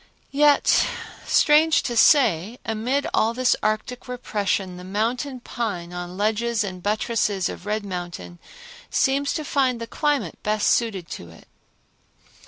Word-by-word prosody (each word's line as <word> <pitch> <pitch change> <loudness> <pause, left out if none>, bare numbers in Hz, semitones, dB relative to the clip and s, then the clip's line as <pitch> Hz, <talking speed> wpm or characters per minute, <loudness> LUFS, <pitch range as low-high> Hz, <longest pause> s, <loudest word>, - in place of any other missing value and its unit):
Yet, 290 +1 +4 0.4
strange 310 +1 +4
to 240 - -3
say, 225 - +4
amid 240 +6 -1
all 225 +2 +2
this 255 0 +3
arctic 215 +4 -2
repression 205 -6 -2
the 180 - -9
mountain 240 +7 -2
pine 180 -9 -4
on 175 +1 -6
ledges 220 +2 0
and 185 -2 -6
buttresses 210 -2 0
of 185 - -8
Red 210 0 -1
Mountain 175 -2 -6 0.5
seems 280 +1 +1
to 310 -2 -3
find 260 -4 +1
the 230 - -4
climate 295 +4 -1
best 210 0 +1
suited 200 -8 0
to 85 - -7
it. 85 - -17
220 Hz, 135 wpm, -23 LUFS, 195-255 Hz, 0.5 s, Yet